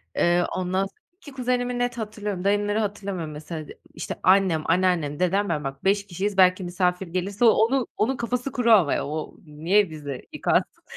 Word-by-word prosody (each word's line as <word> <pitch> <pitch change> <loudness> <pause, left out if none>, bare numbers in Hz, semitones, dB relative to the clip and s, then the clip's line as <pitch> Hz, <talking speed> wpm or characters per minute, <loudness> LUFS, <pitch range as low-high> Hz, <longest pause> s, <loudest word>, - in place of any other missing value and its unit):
eee, 175 +1 +3
ondan 185 +1 0
s - - -10 0.3
2 290 - -13
kuzenimi 250 -1 -1
net 245 0 -1
hatırlıyorum, 210 -4 -4
dayımları 205 +1 +1
hatırlamıyorum 200 -6 -3
mesela. 155 0 -7
De - - -13
işte 160 - -5
annem, 185 -4 +4
anneannem, 165 -4 +1
dedem, 195 +2 +1
ben 150 -3 -1
bak 135 0 -6
5 200 +1 +2
kişiyiz, 195 +2 -3
belki 185 0 +5
misafir 180 +1 -1
gelirse 195 +6 -1
o - - +9
onu 240 +4 +2
onun 245 +4 +1
kafası 250 +3 -2
kuru 235 -2 +1
ama 185 -10 +5
ya, - - -1
o 155 +1 -5
niye 165 +6 +1
bizde 145 -4 -7
yıkansın? - - 0
190 Hz, 180 wpm, -24 LUFS, 170-215 Hz, 0.3 s, o